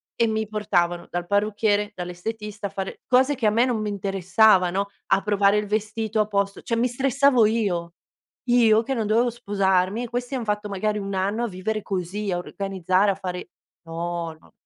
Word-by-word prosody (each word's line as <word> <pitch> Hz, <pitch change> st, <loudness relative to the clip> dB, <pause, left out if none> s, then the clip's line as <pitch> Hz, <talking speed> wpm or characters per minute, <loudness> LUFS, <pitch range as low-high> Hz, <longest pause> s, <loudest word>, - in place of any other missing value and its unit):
e 230 Hz, -, +2 dB
mi 220 Hz, 0 st, -1 dB
portavano 180 Hz, -5 st, 0 dB
dal 175 Hz, 0 st, -3 dB
parrucchiere, 205 Hz, +1 st, +1 dB
dall'estetista, 205 Hz, +4 st, -5 dB
a -, -, -10 dB
fare 195 Hz, -1 st, -6 dB
cose 260 Hz, +3 st, +4 dB
che 235 Hz, -4 st, 0 dB
a -, -, +6 dB
me 235 Hz, +3 st, +3 dB
non 240 Hz, -4 st, -1 dB
mi 210 Hz, -, -2 dB
interessavano, 195 Hz, 0 st, +2 dB, 0.2 s
a 195 Hz, -, +3 dB
provare 205 Hz, 0 st, +3 dB
il 210 Hz, -, 0 dB
vestito 215 Hz, +1 st, -2 dB
a 210 Hz, -, +2 dB
posto 200 Hz, -1 st, -1 dB
cioè 230 Hz, -, -2 dB
mi 245 Hz, +2 st, +2 dB
stressavo 265 Hz, -1 st, +3 dB
io. 185 Hz, -7 st, -1 dB, 0.6 s
Io 230 Hz, -2 st, +5 dB
che 270 Hz, -, -2 dB
non 225 Hz, -3 st, -1 dB
dovevo 230 Hz, +3 st, +3 dB
sposarmi 200 Hz, -1 st, 0 dB
e 240 Hz, -, -6 dB
questi 245 Hz, +3 st, -3 dB
han 245 Hz, -, -3 dB
fatto 210 Hz, 0 st, -2 dB
magari 210 Hz, +2 st, -1 dB
1 200 Hz, 0 st, -5 dB
anno 200 Hz, +5 st, 0 dB
a -, -, -2 dB
vivere 210 Hz, +3 st, -3 dB
così, 195 Hz, +2 st, -3 dB
a 175 Hz, -, 0 dB
organizzare, 190 Hz, +1 st, 0 dB
a -, -, -3 dB
fare 180 Hz, -1 st, -6 dB, 0.4 s
no, 165 Hz, 0 st, -4 dB
no. -, -, -22 dB
210 Hz, 190 wpm, -24 LUFS, 190-220 Hz, 0.6 s, a